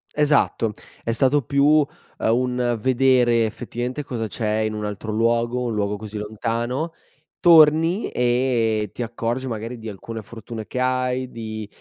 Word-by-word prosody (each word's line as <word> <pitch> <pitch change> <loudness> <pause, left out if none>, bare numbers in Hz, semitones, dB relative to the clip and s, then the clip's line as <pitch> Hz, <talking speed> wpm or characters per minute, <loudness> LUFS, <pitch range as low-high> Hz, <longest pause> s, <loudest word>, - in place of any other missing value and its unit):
Esatto, 145 -7 +2 0.3
è 115 - -1
stato 135 +5 +3
più, 140 +3 +1
uhm, 150 -1 +5 0.3
un 125 0 +1
vedere 125 -2 +3
effettivamente 120 +5 -4
cosa 115 -5 -3
c'è 110 -1 -1
in 110 0 -1
un 105 0 -3
altro 105 +1 -5
luogo, 115 +2 +1
un 115 - -1
luogo 105 0 -1
così 105 0 -7
lontano. 115 +8 -2 0.5
Torni 165 +3 +5
e 120 -4 +1
ti - - -6
accorgi 120 +2 -2
magari 115 +1 -5
di 110 0 -6
alcune 110 +3 -7
fortune 110 0 -8
che 125 - -4
hai, 130 0 0
di, 110 -2 -6
120 Hz, 145 wpm, -22 LUFS, 110-130 Hz, 0.5 s, uhm